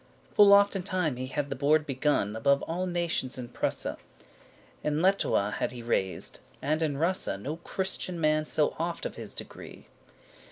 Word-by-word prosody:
Full 205 -1 +7
often 200 -1 +5
time 180 -8 -1
he 130 +1 -4
had 140 +1 -3
the - - -1
board 150 +3 +3
begun 135 -6 0
Above 140 +5 +2
alle 180 +3 -2
nations 170 -8 -1
in 120 -2 -6
Prusse.<7> - - -2 0.9
In 150 0 0
Lettowe 180 - +2
had - - -1
he 120 -1 -8
reysed,* 95 -5 -2 0.2
and 155 +3 0
in 150 -3 0
Russe, 175 +5 +1
*journeyed 95 +1 -3
No 150 +6 -3
Christian 185 0 -3
man 155 -1 +2
so 150 0 0
oft 170 +1 -2
of - - -3
his - - -9
degree. - - -9
155 Hz, 170 wpm, -29 LUFS, 130-175 Hz, 0.9 s, Full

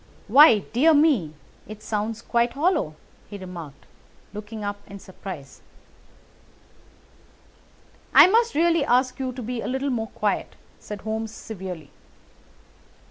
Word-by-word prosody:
"Why, 265 +1 +8 0.2
dear 305 +7 +5
me, 265 - +2 0.3
it 215 0 -10
sounds 220 +1 -3
quite 235 0 +1
hollow!" 290 - 0 0.3
he 205 - -7
remarked, 175 -7 -10 0.5
looking 210 +1 -7
up 205 0 -3
in 200 - -9
surprise. 185 -7 -10 2.5
"I - - +9
must 460 +2 +2
really 335 0 +3
ask 255 0 +1
you 260 -1 -2
to 250 0 -8
be 240 +1 -4
a - - -5
little 265 +2 -2
more 225 -3 -2
quiet!" - - -2 0.2
said 210 -2 -8
Holmes 220 +1 -3
severely. 185 -9 -8
225 Hz, 125 wpm, -24 LUFS, 200-265 Hz, 2.5 s, I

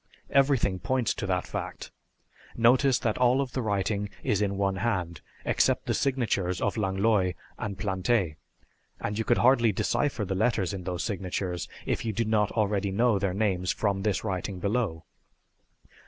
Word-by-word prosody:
"Everything 135 -9 +3
points 130 +2 0
to 95 - -4
that 90 -1 0
fact. - - -6 0.6
Notice 125 +3 +4
that 110 0 -1
all 125 +1 +4
of 135 -2 -1
the 130 - -1
writing 100 -1 -1
is 105 -1 +1
in 100 -1 0
one 95 -1 0
hand, 90 -8 -2 0.2
except - - +2
the - - 0
signatures 115 -9 0
of 100 - 0
Langlois 95 -2 +1 0.3
and 100 -2 -4
Plante, 95 -3 0 0.6
and 105 +1 -3
you - - +1
could 120 - +2
hardly 120 -3 +4
decipher 130 +3 0
the 95 - -2
letters 95 -1 +1
in 95 -3 -6
those 90 -1 -2
signatures 95 -3 -3 0.2
if - - -1
you 110 - -2
did 115 +1 -1
not 105 -2 +2
already 105 -2 +1
know 110 +1 +2
their 95 -1 -1
names 95 -4 +1
from 100 -2 0
this 100 -1 0
writing 95 -2 -3
below. 100 -4 -1
105 Hz, 165 wpm, -28 LUFS, 95-115 Hz, 0.6 s, Notice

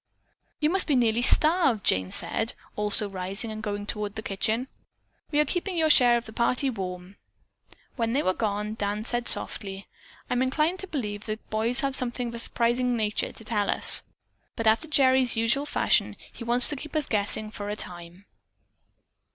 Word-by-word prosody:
"You 305 +1 +1
must 380 +1 +2
be 290 - +1
nearly 235 -2 +1
starved," 305 - +5
Jane 95 0 +1
said, 225 - 0 0.2
also 210 0 +4
rising 195 +3 -4
and 215 0 -7
going 205 -1 -5
toward 210 0 -3
the 220 - -7
kitchen. 220 +6 -1 0.6
"We 295 - 0
are 300 - +3
keeping 355 +2 -4
your 315 -1 +3
share 245 -4 +5
of 235 - -6
the 220 - -11
party 250 +4 0
warm." 185 -2 -7 0.8
When 230 -1 -1
they 285 - 0
were 185 - +1
gone, 210 0 -3
Dan 210 -1 -3
said 240 +1 -2
softly: 195 -1 +1 0.4
"I'm 250 0 -1
inclined 305 +7 0
to 385 - -8
believe 210 - -5
that 215 0 -4
the - - -38
boys 230 +5 0
have 275 -2 -1
something 245 -1 -3
of - - -10
a 235 - -2
surprising 240 +1 0
nature 215 -1 -2
to - - -13
tell 210 -3 -1
us, - - +5 0.5
but 230 - -4
after 220 +8 +2
Gerry's 260 -5 +3
usual 235 +6 0
fashion - - +1 0.2
he - - -9
wants 240 +1 +5
to 300 - -2
keep 305 +3 -10
us 305 -2 0
guessing 215 0 -3
for 205 -1 -7
a 210 - -3
time." 175 -1 -8
230 Hz, 185 wpm, -25 LUFS, 210-260 Hz, 0.8 s, starved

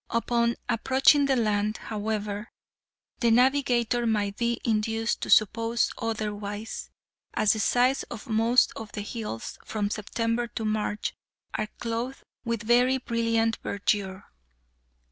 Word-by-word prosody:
Upon 235 0 +1
approaching 270 +4 +4
the 270 - +3
land, 215 -2 +1
however, 210 0 -3 0.7
the 235 - +3
navigator 245 -1 +3
might 205 -2 0
be 235 +1 0
induced 225 0 0
to - - -4
suppose 230 +2 +3
otherwise, 210 -1 -4 0.5
as 215 -1 +4
the 220 - -3
sides 250 +4 +3
of 230 - -7
most 230 +2 +3
of 220 -1 -8
the 210 - -4
hills, 210 - -6
from 205 -2 -2
September 230 +3 -1
to 225 -1 -5
March, 215 -1 -1 0.4
are 215 - -1
clothed 235 +3 -3 0.2
with 230 -3 -2
very 245 +3 +4
brilliant 230 -2 0
verdure. 195 -1 -2
225 Hz, 125 wpm, -27 LUFS, 215-235 Hz, 0.7 s, approaching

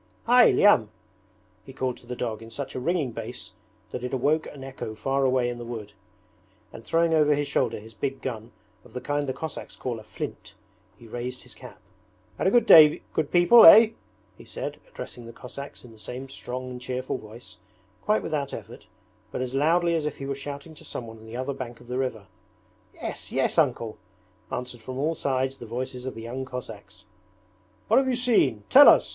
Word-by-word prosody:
'Hy, 245 +1 +7
Lyam!' 130 - +5 0.7
he 135 - -12
called 130 -1 -2
to 120 - -17
the 125 - -5
dog 115 -3 -4
in 115 - -10
such 140 +4 -6
a - - -4
ringing 150 -1 0
bass 115 +2 -7 0.4
that 125 - -5
it 125 +1 -2
awoke 150 +5 +1
an 140 -2 -10
echo 130 -5 -7
far 135 +5 0
away 130 -2 +2
in 120 0 -4
the - - -6
wood; 110 -3 -7 0.8
and 115 - -10
throwing 165 +7 +2
over 150 -2 +4
his 145 0 -1
shoulder 125 -5 0
his 110 +2 -14
big 135 +5 -3
gun, 115 -2 -6 0.3
of 120 - -18
the 125 - -4
kind 145 +2 -2
the - - +1
Cossacks 160 +3 -7
call 120 -3 -4
a - - -12
'flint', - - -7 0.4
he 115 - -15
raised 125 +3 -6
his 125 - -12
cap. 110 - -13 0.6
'Had - - +1
a - - +6
good 235 +2 +4
day, 155 -7 +8
good 155 -2 0
people, 180 +7 +7
eh?' 220 +6 +10 0.5
he - - -11
said, - - -6
addressing 120 - -9
the - - -8
Cossacks 140 +3 -9
in 120 - -13
the 110 - -16
same 125 +5 -7
strong 130 -1 -6
and 125 0 -8
cheerful 130 +1 -3
voice, 110 -4 -12 0.4
quite 210 0 +1
without 145 -3 -2
effort, - - -11 0.4
but - - -4
as 130 0 -3
loudly 170 +5 +2
as 160 -2 0
if 150 - -5
he 135 - -6
were 140 - -2
shouting 140 +3 -8
to - - -14
someone 115 -2 -7
on 110 - -14
the 115 +2 -7
other 130 +2 -2
bank 120 -3 -7
of 120 - -16
the 125 +2 -3
river. 120 -6 -3 0.7
'Yes, - - -6
yes. - - +1
Uncle!' - - 0 0.5
answered 125 -1 -5
from 130 +3 -7
all 155 +4 0
sides 135 -3 -1
the 120 - -10
voices 125 +2 -5
of 130 - -5
the 115 - -8
young 125 +3 -5
Cossacks. 110 -5 -9 0.8
'What 220 - +4
have 265 0 +4
you 255 - +1
seen? 220 - +2
Tell - - +10
us!' - - +5
130 Hz, 205 wpm, -26 LUFS, 120-145 Hz, 0.8 s, eh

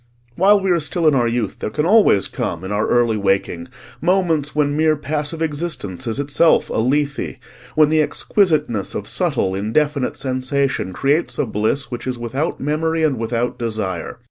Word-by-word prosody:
While 200 +3 +5
we 190 -1 +1
are 175 - +3
still 160 +2 0
in 155 - +5
our 120 -3 +2
youth 115 -3 -2
there - - -3
can 150 +8 -1
always 200 - +4
come, 85 - -4
in 95 - -5
our 105 +1 0
early 120 -2 +2
waking, 95 -4 -1 0.3
moments 165 -5 +1
when 145 -1 +1
mere 155 0 +3
passive 150 +2 -2
existence 145 - -3
is 115 +4 -2
itself 145 +3 +2
a - - -2
Lethe, 140 +3 -1 0.4
when 155 -1 +5
the 155 0 +3
exquisiteness 150 - 0
of - - -4
subtle 95 - 0
indefinite 130 +8 0
sensation 130 -4 -1
creates 140 - 0
a - - +1
bliss 110 +6 -1
which 120 +1 -5
is 125 -1 -2
without 130 +7 -3
memory 160 +3 -1
and 140 -6 +1
without 120 +2 -2
desire. 110 -5 -3
140 Hz, 170 wpm, -19 LUFS, 115-155 Hz, 0.4 s, While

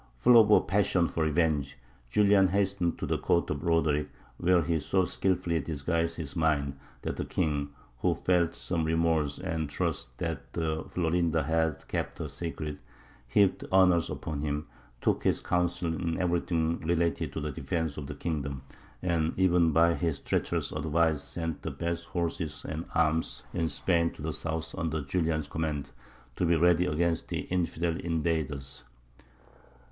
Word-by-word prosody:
Full 120 - +7
of 105 - +2
a 105 - +7
passion 95 -3 +2
for 85 - -3
revenge, 75 -3 +1 0.3
Julian 100 +4 +5
hastened 95 -2 0
to - - -3
the - - -1
Court 85 - +1
of 70 -2 -2
Roderick, 80 -4 +2 0.3
where 90 -1 +4
he 80 0 0
so 95 +5 +1
skilfully 90 -3 0
disguised 85 +3 -1
his 80 -1 -5
mind 70 -4 +1 0.2
that - - -3
the - - -1
king, 70 -2 -1 0.3
who - - +2
felt 85 -2 +1
some 85 -1 -2
remorse 80 -3 +1
and 80 -2 -3
trusted 80 +1 -2
that 80 -1 -2
Florinda 85 -2 +1
had 80 0 0
kept - - -2
the 80 - -4
secret, 75 0 -5 0.5
heaped 100 +8 +3
honours 90 -3 +5
upon 75 -2 -4
him, 75 0 -2 0.4
took - - +1
his - - +2
counsel 90 -1 0
in 85 +1 -2
everything 85 -2 0
relating 85 -1 0
to 70 - -5
the 75 0 -3
defence 75 +3 -2
of 75 -2 -6
the 75 - -6
kingdom, 70 -4 -3 0.4
and 85 -2 0
even 90 -3 +4
by 85 +2 +4
his 85 -4 -1
treacherous - - -1
advice 80 -1 +1
sent 80 0 -4
the - - -3
best 85 0 -3
horses 85 -4 -3
and 80 +2 -4
arms 80 0 +1
in 85 -2 0
Spain 85 0 +1
to - - -10
the 80 0 -2
south 80 -1 -3
under 80 -1 -2
Julian's 80 0 0
command, 75 -2 -3 0.5
to 90 - +1
be 85 - +4
ready 90 +2 +4
against 85 0 0
the - - -2
infidel 85 -2 -1
invaders. 80 -5 -2
80 Hz, 155 wpm, -29 LUFS, 75-85 Hz, 0.5 s, Full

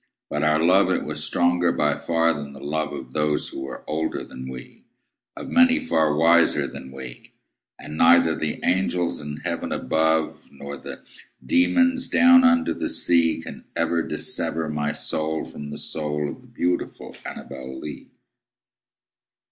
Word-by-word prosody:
But - - -1
our 75 +1 +3
love 90 +4 +4
it 95 - 0
was - - -2
stronger 85 0 +2
by 75 -3 +1
far 85 0 +1
than 70 -2 -7
the 70 - -11
love 80 +3 -2
Of 65 0 -8
those 75 -1 0
who - - -7
were 65 0 -8
older 80 +1 -2
than 65 0 -9
we 65 -1 -11 0.5
Of - - -7
many 255 +1 +5
far 80 - +1
wiser 85 +1 +4
than 65 - -9
we 65 -2 -10 0.4
And 75 0 -8
neither 80 0 +5
the 75 -1 -3
angels 90 -3 0
in 75 0 -7
heaven 85 -1 -3
above, 80 +3 0
Nor 70 0 -8
the - - -9 0.4
demons 265 -2 +3
down 255 0 +6
under 255 0 +3
the 315 - -3
sea, 85 - +2
Can - - -9
ever 85 -1 +1
dissever 80 0 -1
my 75 -1 -1
soul 80 0 -2
from 75 0 -9
the 75 - -6
soul 75 -1 -3
Of - - -9
the - - -19
beautiful 90 0 -3
ANNABEL 65 -1 -8
LEE. 75 -1 -8
80 Hz, 155 wpm, -23 LUFS, 75-85 Hz, 0.5 s, down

